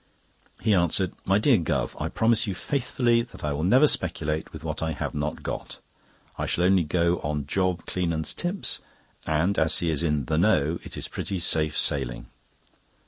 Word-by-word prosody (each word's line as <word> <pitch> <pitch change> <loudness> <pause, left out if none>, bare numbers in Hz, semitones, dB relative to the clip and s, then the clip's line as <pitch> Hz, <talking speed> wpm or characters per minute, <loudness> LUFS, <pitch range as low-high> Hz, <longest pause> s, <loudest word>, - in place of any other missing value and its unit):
He 110 - +2
answered: 90 0 +2
"My 95 +1 +3
dear 115 +1 +4
Guv., 80 - -1
I - - -1
promise 110 0 +2
you 95 - -2
faithfully 120 -1 +1
that 120 - -11
I 75 -1 -1
will 70 - -3
never 125 - +5
speculate 80 - 0
with - - -9
what - - -4
I 80 0 -1
have - - -4
not 75 0 -3
got. - - -5 0.6
I - - -1
shall 85 - 0
only 95 -1 +4
go 85 +2 +1
on 75 -1 -3
Job 90 +2 -1
Cleanands' 85 -3 -1
tips, 180 +3 -1 0.5
and 80 +6 +1
as 80 - +3
he 85 -2 +1
is 75 - -1
in 75 -5 0
the 80 +4 0
'know' 85 -4 +2
it - - -8
is - - -4
pretty 95 - -3
safe 80 -3 +1
sailing." - - 0
85 Hz, 185 wpm, -26 LUFS, 75-100 Hz, 0.6 s, never